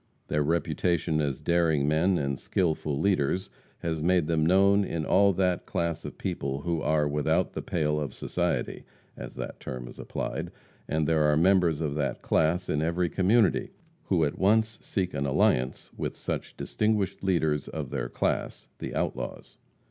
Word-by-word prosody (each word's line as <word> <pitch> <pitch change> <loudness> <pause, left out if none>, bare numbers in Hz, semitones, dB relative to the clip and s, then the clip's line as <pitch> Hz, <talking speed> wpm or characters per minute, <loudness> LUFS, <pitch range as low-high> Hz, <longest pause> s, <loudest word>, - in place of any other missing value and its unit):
Their 75 - +1
reputation 80 0 0
as 70 -3 -1
daring 80 -4 +2
men 85 +5 +3
and 70 -3 -2
skillful 80 -5 -1
leaders 95 -1 +1 0.3
has 80 -2 -1
made 90 0 +3
them 80 -1 +1
known 100 +4 +5
to 85 -5 -2
all 100 +5 +4
that 90 -1 0
class 85 -1 -2
of - - -7
people 70 0 -3
who 85 0 -1
are 75 -1 +2
without 80 +5 +1
the - - -4
pale 75 -2 0
of 75 -2 -4
society, - - -2 0.3
as - - -8
that - - -6
term 60 -1 -6
is - - -12
applied 80 +7 -4 0.4
and 80 -1 0
there 80 -2 +3
are 75 0 +3
members 85 -2 +3
of 75 -3 -1
that 70 -2 -2
class 90 +4 +1
in 75 - 0
every 85 +2 0
community 95 +3 +2 0.3
who 80 - +2
at 70 - -4
once 110 +3 +2
seek 95 -3 -2
an 70 -1 -1
alliance 65 -1 +1
with - - -3
such - - -4
distinguished 105 -3 -1
leaders 80 -6 +1
of - - -5
their - - -2
class - - -2
the - - -5
outlaws. - - -4
80 Hz, 165 wpm, -28 LUFS, 75-90 Hz, 0.4 s, known